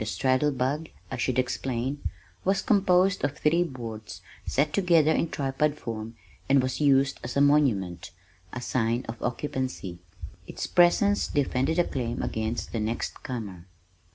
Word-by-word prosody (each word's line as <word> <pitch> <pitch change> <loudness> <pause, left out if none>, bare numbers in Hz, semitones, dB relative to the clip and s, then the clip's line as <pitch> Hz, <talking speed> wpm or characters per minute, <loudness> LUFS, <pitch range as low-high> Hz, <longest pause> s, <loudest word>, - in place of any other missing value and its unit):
The 110 - -2
straddle 130 +5 +2
bug, 140 +4 -1 0.2
I 130 - -3
should 125 0 0
explain, 130 +1 -1 0.4
was 195 +1 +1
composed 195 -3 +3
of 145 0 -1
three 165 +3 +3
boards 115 -8 -7 0.2
set 150 +2 +1
together 170 -5 +4
in 165 - +1
tripod 145 +1 0
form 115 0 -6 0.3
and 135 0 +6
was 130 +3 -2
used 140 -1 +3
as 120 +2 -4
a - - +4
monument, 130 - +2 0.4
a 125 - -5
sign 120 0 0
of 115 0 -7
occupancy. 125 -8 -3 0.5
Its - - -4
presence 200 +4 +4
defended 140 +2 0
a 175 - +5
claim 120 -6 -3
against 110 +1 -3
the 115 - -2
next 110 +2 -3
comer. 105 -10 -6
130 Hz, 150 wpm, -27 LUFS, 115-150 Hz, 0.5 s, and